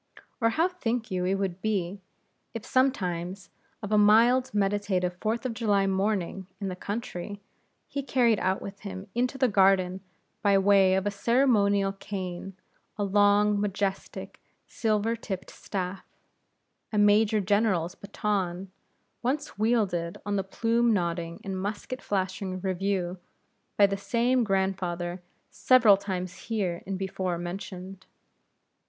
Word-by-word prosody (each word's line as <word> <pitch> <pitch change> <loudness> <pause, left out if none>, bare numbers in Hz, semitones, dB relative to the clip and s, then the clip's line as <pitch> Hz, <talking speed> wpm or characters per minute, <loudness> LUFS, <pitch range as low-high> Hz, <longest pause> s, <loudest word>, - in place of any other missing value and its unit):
Or 230 - +4
how 320 +9 +2
think 240 - -3
you 180 -1 -1
it 190 +2 +1
would 190 -2 -3
be, 195 -3 -1 0.5
if 225 - -5
sometimes 190 -8 0 0.3
of 205 - -5
a 210 - +5
mild 235 +5 +5
meditative 195 -3 0
Fourth 225 +3 -1
of 250 - -1
July 205 -4 +2
morning 195 -1 -1
in 195 -2 -3
the 180 - -4
country, 205 -1 -5 0.5
he 280 - -3
carried 245 -5 +2
out 190 +1 0
with 200 0 -8
him 190 -2 -7
into 250 +2 0
the 260 -1 +3
garden 190 -3 +3 0.4
by 200 -1 +4
way 195 -1 +5
of 195 +2 0
ceremonial 205 -4 +3
cane, 195 -1 -6 0.4
a 205 - -1
long, 205 +1 +4
majestic, 195 -1 -3 0.2
silver 220 0 0
tipped 195 -4 -6
staff, 190 -1 -5 0.9
a 215 - -1
Major 210 +1 +4
General's 195 -3 +1
baton, 195 -3 -3 0.5
once 275 -1 -2
wielded 200 -7 +1
on 205 0 -1
the 195 - 0
plume 230 +4 +1
nodding 170 -3 -2
and 190 -2 -4
musket 215 +5 -4
flashing 190 -1 -2
review 185 -1 -1 0.6
by 205 - +7
the 195 0 -1
same 240 +4 +1
grandfather 185 -3 -1 0.3
several 235 -6 +6
times 185 -2 -5
here 195 -7 -1
in 195 -1 -2
before 185 -2 -2
mentioned? 185 +1 -7
200 Hz, 130 wpm, -27 LUFS, 185-220 Hz, 0.9 s, by